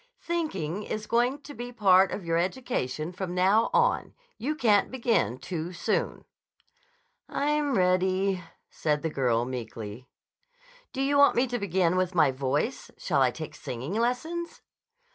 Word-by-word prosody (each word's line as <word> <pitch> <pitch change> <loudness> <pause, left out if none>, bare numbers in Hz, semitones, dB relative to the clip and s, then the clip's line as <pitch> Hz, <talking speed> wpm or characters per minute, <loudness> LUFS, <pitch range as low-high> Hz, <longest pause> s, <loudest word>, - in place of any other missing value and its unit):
"Thinking 210 - -2
is 215 +1 -4
going 245 +6 +1
to 290 - -9
be 245 -2 -7
part 195 -5 +5
of 195 - -5
your 165 0 +1
education 170 - -2
from 180 -1 -4
now 195 +5 +3
on. 475 +1 +1 0.2
You 300 +5 -1
can't 215 -8 +3
begin 230 - 0
too 170 +4 -5
soon." - - -2 1.0
"I'm 295 -2 0
ready," 185 +1 +2 0.3
said 150 -1 -1
the 160 - -1
girl 120 -4 +1
meekly. 115 -1 -7 0.8
"Do 270 - -2
you 285 +1 +2
want 285 - +6
me 245 - +3
to 245 -1 -3
begin 185 -3 +1
with 185 0 0
my 150 -5 +5
voice? 135 +2 -2
Shall - - 0
I - - +5
take - - -7
singing 130 +8 -6
lessons?" 255 +10 -2
190 Hz, 145 wpm, -27 LUFS, 160-245 Hz, 1.0 s, want